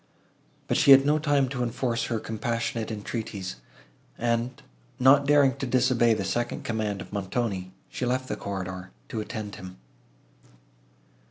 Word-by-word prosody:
But - - +1
she - - +3
had 135 0 +9
no 150 +1 +3
time 145 -3 +2
to 125 -1 -3
enforce 120 0 -1
her 115 -2 -1
compassionate 115 +1 -2
entreaties, 105 - -5 0.6
and, 120 +1 -1 0.4
not 140 +2 +5
daring 140 -3 +5
to 135 - -3
disobey 125 -2 +3
the 100 - -3
second 120 +5 -2
command 110 -3 -2
of - - -11
Montoni, 100 -2 -2 0.2
she 125 - -3
left 130 +1 -1
the - - -2
corridor, 95 -2 -5 0.2
to 110 - -3
attend 105 -2 -6
him. 95 0 -10
115 Hz, 145 wpm, -27 LUFS, 105-130 Hz, 0.6 s, had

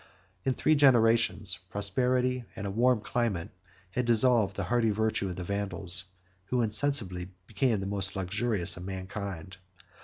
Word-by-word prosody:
In 130 - +1
three 155 - +2
generations, 115 -8 +3
prosperity 125 +5 +1
and 100 -3 -6
a 100 - -3
warm 120 +2 +2
climate 110 -7 -2 0.4
had 125 +4 -1
dissolved 115 -4 +3
the 100 - -3
hardy 115 +4 +1
virtue 110 -2 -1
of 90 - -6
the 90 - -6
Vandals, 95 -1 +1 0.4
who 120 +4 0
insensibly 105 -6 +1 0.2
became 110 +2 0
the 95 - -4
most 100 -1 -1
luxurious 95 -1 0
of 90 - -8
mankind. 95 -1 -6
105 Hz, 145 wpm, -28 LUFS, 95-120 Hz, 0.4 s, generations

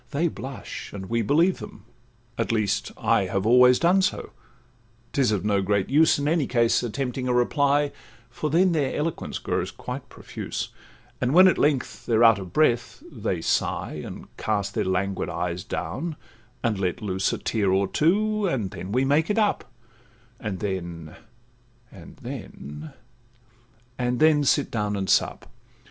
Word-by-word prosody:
They 155 +4 0
blush, 135 -3 -8
and 95 +1 -7
we 115 0 +2
believe 165 - +2
them; - - -10 0.5
at - - -1
least 110 -3 0
I - - +2
Have 95 +1 -2
always 125 +2 +6
done 180 +3 +3
so; 190 - -1 0.8
'tis 130 -5 +2
of 105 -2 -1
no 100 -2 +2
great 100 0 0
use, 155 +3 +5
In 145 0 -1
any 155 -4 +1
case, 120 -2 +2
attempting 125 +2 -3
a 125 - +1
reply, 140 +3 +2 0.4
For 150 +5 -3
then 180 +5 +4
their 145 -5 0
eloquence 160 +2 -3
grows - - -2
quite - - -7
profuse; - - -6 0.5
And 125 +4 +1
when 185 +1 +9
at 185 - +2
length 145 -3 0
they're 115 0 +3
out 115 -3 +6
of 95 -3 -8
breath, 120 - +1
they - - -3
sigh, - - -1
And - - -10
cast 100 -2 -1
their - - -1
languid 95 0 -1
eyes 85 +1 -3
down, 155 - -4 0.5
and 110 -4 0
let 90 +1 -2
loose 95 -2 0
A - - -2
tear 105 -4 0
or 95 +1 +2
two, 210 - +1
and 115 - -1
then 95 - -7
we 130 +4 +2
make 150 +4 +2
it 210 - 0
up; 205 - 0 0.7
And 100 -4 -5
then—and 110 +5 -9
then—and 120 - -8
then—sit 150 -2 +3
down 105 -2 -1
and 95 -1 -2
sup. - - +1
120 Hz, 155 wpm, -25 LUFS, 100-145 Hz, 0.8 s, when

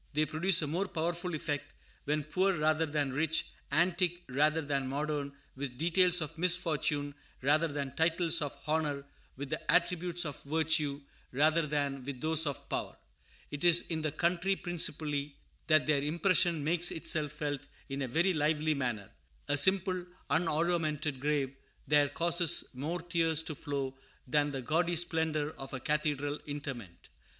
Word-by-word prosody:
They 155 +1 +2
produce 165 +3 +2
a - - -1
more 175 +7 -1
powerful 175 0 -2
effect 145 -2 -3 0.3
when 150 +1 0
poor 185 +5 +1
rather 155 +1 +2
than 145 -3 -1
rich, 160 +3 +1 0.3
antique 175 +2 +2
rather 150 +5 +2
than 140 -2 -1
modern, 145 +1 -2 0.2
with 130 -2 -6
details 175 +3 +3
of 155 +1 -4
misfortune 160 -5 +1 0.3
rather 155 +4 +3
than 140 -3 -4
titles 165 0 +2
of 145 -1 -4
honor, 150 -3 -1 0.3
with 140 +1 -6
the 155 - 0
attributes 175 0 +2
of 145 - -5
virtue 155 -1 +1 0.3
rather 155 +4 +3
than 140 -2 -1
with 135 -1 -6
those 160 +1 +2
of 140 - -4
power. - - -3 0.5
It 145 +1 -5
is 175 -1 +6
in 160 -1 0
the 155 -1 -1
country 180 +5 +1
principally 150 -5 -1 0.3
that 155 -2 +4
their 150 -2 +2
impression 170 +1 +2
makes 170 +3 +3
itself 155 -2 0
felt 145 -2 -3 0.3
in 135 0 -4
a 135 - -1
very 170 +9 +2
lively 155 0 +1
manner. 120 -8 -3 0.4
A 145 - +3
simple, 185 +4 +2 0.3
unoruamented 155 -4 0
grave 140 -1 -1 0.3
there 145 -1 +4
causes 170 +2 +3
more 160 +7 -4
tears 165 -2 +1
to 160 - -5
flow 140 -2 -4 0.3
than 145 +3 +2
the 135 -2 -5
gaudy 170 +6 +1
splendor 160 -3 0
of 135 0 -6
a - - -4
cathedral 145 0 -1
interment. 135 - -7
155 Hz, 155 wpm, -31 LUFS, 145-170 Hz, 0.5 s, is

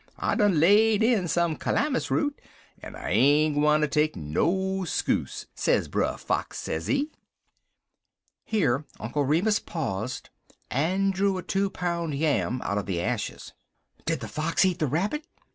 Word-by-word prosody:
I - - 0
done 205 -7 +3
laid 210 +5 +5
in 225 -6 +2
some 170 -1 +1
calamus 285 - 0
root, 290 -1 0 0.4
en - - -9
I - - -5
ain't 145 +8 +4
gwineter 150 +1 +3
take 150 +1 +1
no 190 - 0
skuse,' 175 - -1
sez - - +1
Brer - - -1
Fox, - - -2
sezee." 280 - -1 1.3
Here 155 - +1 0.2
Uncle 140 +6 -1
Remus 180 +10 +2
paused, 120 - -4 0.4
and 190 +8 +1
drew 195 0 +1
a 180 - -5
two 195 0 0
pound 170 -5 -2
yam 140 -4 0
out 100 - -1
of 100 - -6
the 90 -3 -1
ashes. 110 +4 -3 0.5
"Did - - 0
the - - -5
fox 165 +4 +1
eat 180 -2 0
the 155 - +1
rabbit?" 195 - -1
165 Hz, 145 wpm, -26 LUFS, 140-195 Hz, 1.3 s, laid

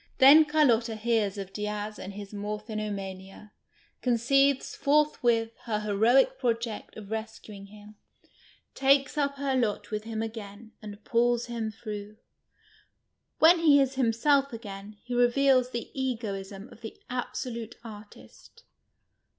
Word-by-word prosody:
Then 290 +4 +8
Carlotta 245 -7 +2
hears 215 -2 0
of 195 -1 -7
Diaz 210 0 -4
and 195 - -7
his 205 0 -9
niorphinoniania, 205 -2 -6 0.5
conceives 265 +3 +2
forthwith 245 -6 +2
her 220 -3 -1 0.2
lieroic 250 - +3
project 230 -2 -3
of 215 - -8
reseuinjr 220 -2 -7
him, 210 +1 -15 0.8
takes 275 0 +3
uj) 280 -2 -1
her 275 -1 -1
lot 225 -5 -1
with 215 0 -4
him 225 -1 -3
again, 220 -1 -8
and 210 -1 -10
pulls 240 +1 +1
him 230 -2 -4
through. 215 -1 -8 1.2
When 335 +2 +6
he 300 -4 +5
is 270 -1 +1
him 255 -4 +1
self 275 +4 +2
again, 210 -2 -9
he 245 - -6
reveals 255 +1 +3
the 235 -2 -6
egoism 210 -6 -4
of - - -16
the 220 - -9
absolute 240 -2 -5
artist. 220 - -14
225 Hz, 125 wpm, -28 LUFS, 210-260 Hz, 1.2 s, Then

